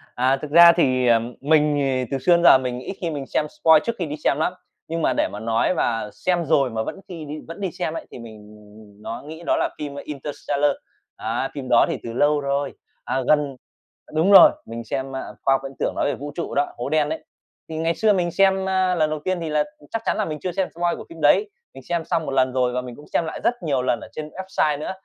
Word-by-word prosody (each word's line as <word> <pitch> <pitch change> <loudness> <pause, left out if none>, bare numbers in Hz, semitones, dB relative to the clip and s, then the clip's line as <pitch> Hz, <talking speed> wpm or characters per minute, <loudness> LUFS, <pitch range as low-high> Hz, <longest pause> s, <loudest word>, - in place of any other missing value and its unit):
À, 130 +2 +2
thực 150 - -7
ra 170 +2 +9
thì, 130 -6 +2
ờ, 115 -1 +5 0.2
mình 150 0 +3
thì 130 -2 0
từ 135 - 0
xưa 135 - +1
đến 170 - +1
giờ 150 - +9
mình 125 -1 -4
ít 130 - -6
khi 170 - -1
mình 145 -3 -4
xem - - 0
spoil 160 +1 +4
trước 235 - -1
khi 175 - -1
đi 150 -1 -5
xem 140 - +2
lắm, 160 +4 0 0.3
nhưng 165 +1 -3
mà 130 - +2
để - - +1
mà 105 - -8
nói 115 +9 +1
mà 115 -10 -1
xem 175 -2 -1
rồi 140 -4 +3
mà 110 -1 -2
vẫn - - -6
khi 165 -4 -8
đi 150 +1 -6
vẫn 165 +5 -9
đi 190 -3 -2
xem 155 - -3
ấy, - - -6
thì - - -9
mình, 115 -2 -10
ừm, 105 0 -16
ừm, 105 0 -20
nó 115 - -6
nghĩ 160 +2 -9
đó - - +2
là - - 0
phim 145 -2 -6
"Interstellar." 145 0 -2 0.5
Đấy, 115 +4 -2
phim 135 -3 -6
đó 120 - +5
thì - - -2
từ 115 - -6
lâu 145 +4 +3
rồi, 140 0 -1 0.3
à, 130 - -1
gần 145 -3 +2 0.6
đúng 165 +6 +3
rồi, 200 - +10
mình 115 +1 -7
xem, 135 +3 -4
a, 130 - -3 0.2
khoa 135 - +4
học 135 - +1
viễn 135 0 -7
tưởng - - 0
nói - - 0
về 145 - 0
vũ 145 +1 -7
trụ 170 - -4
đó, 145 +1 +2
hố 120 - -4
đen 155 -1 +2
ấy. 160 - -4 0.5
Thì 160 - -5
ngày 165 +1 0
xưa 215 -1 +3
mình 175 -3 0
xem, 190 +1 +2
a, 185 -1 +2
lần 155 -3 +2
đầu 155 0 -3
tiên 185 -1 0
thì 165 - -3
là 150 -1 +2 0.3
chắc 225 - -2
chắn - - 0
là 215 - 0
mình 155 -1 -5
chưa 180 - -2
xem 185 +1 -1
spoil 175 0 0
của - - -9
phim 165 -1 -11
đấy, 280 - +4 0.2
mình - - -12
xem 170 -2 -1
xong 165 -1 -1
một - - -4
lần 130 -1 +2
rồi 125 -1 +1
và 125 - -1
mình 125 -1 -9
cũng 145 - -14
xem 170 - +2
lại 160 - -5
rất - - +3
nhiều 140 -5 0
lần 125 -1 0
ở - - -10
trên 155 0 -6
website 155 -5 -1
nữa. 155 - -4
150 Hz, 270 wpm, -22 LUFS, 130-165 Hz, 0.6 s, rồi